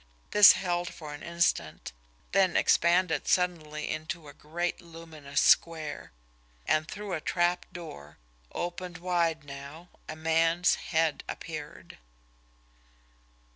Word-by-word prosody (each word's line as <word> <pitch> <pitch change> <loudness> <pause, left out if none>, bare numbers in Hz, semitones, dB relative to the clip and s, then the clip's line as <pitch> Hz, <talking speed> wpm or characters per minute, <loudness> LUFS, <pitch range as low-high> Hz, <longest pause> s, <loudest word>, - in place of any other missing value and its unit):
This 210 -1 +9
held 175 -2 -2
for 150 -3 -9
an 145 - -9
instant, 170 0 -1 0.4
then 190 -2 +3
expanded 170 0 +3
suddenly 155 -4 0
into 155 0 -5
a 145 - -11
great 175 +5 -4
luminous 165 -4 -5
square 160 -3 +2 0.5
and 155 0 +1
through 205 0 -6
a 155 - -2
trapdoor, 175 - -3 0.3
opened 175 0 -5
wide 170 -3 0
now, 140 +5 -10 0.2
a 155 - -5
man's 165 +2 +2 0.2
head 160 -2 +1
appeared. 155 - -8
165 Hz, 105 wpm, -29 LUFS, 155-175 Hz, 0.5 s, This